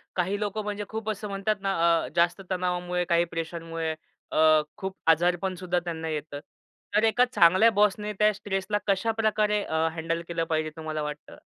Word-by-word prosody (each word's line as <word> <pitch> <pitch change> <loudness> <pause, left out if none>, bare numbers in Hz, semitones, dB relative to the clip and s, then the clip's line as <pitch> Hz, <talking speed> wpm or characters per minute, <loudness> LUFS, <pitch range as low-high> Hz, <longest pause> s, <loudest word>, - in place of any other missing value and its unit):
काही 190 +3 0
लोकं 210 0 -2
म्हणजे 205 0 -3
खूप 220 0 -4
असं 210 0 -3
म्हणतात 200 +2 0
ना, 195 0 0 0.3
अ, - - -4
जास्त 170 +3 +2
तणावामुळे, 180 -1 -1
काही 170 0 +3
प्रेशरमुळे 165 -1 -3 0.4
अ, 155 0 +5 0.2
खूप 190 -2 -4 0.2
आजारपणसुद्धा 180 +2 0
त्यांना 165 -2 -4
येतं. 150 -2 -4 0.6
तर 215 - +4
एका 235 +3 +4
चांगल्या 190 -1 +5
बॉसने 210 0 +2
त्या 210 0 +5
स्ट्रेसला 195 0 -2
कशाप्रकारे 215 +1 +1
अ, 160 -2 0
हँडल 165 0 -2
केलं 170 -1 -1
पाहिजे, 155 -1 0
तुम्हाला 155 -1 -4
वाटतं? 150 0 -7
180 Hz, 155 wpm, -27 LUFS, 165-210 Hz, 0.6 s, अ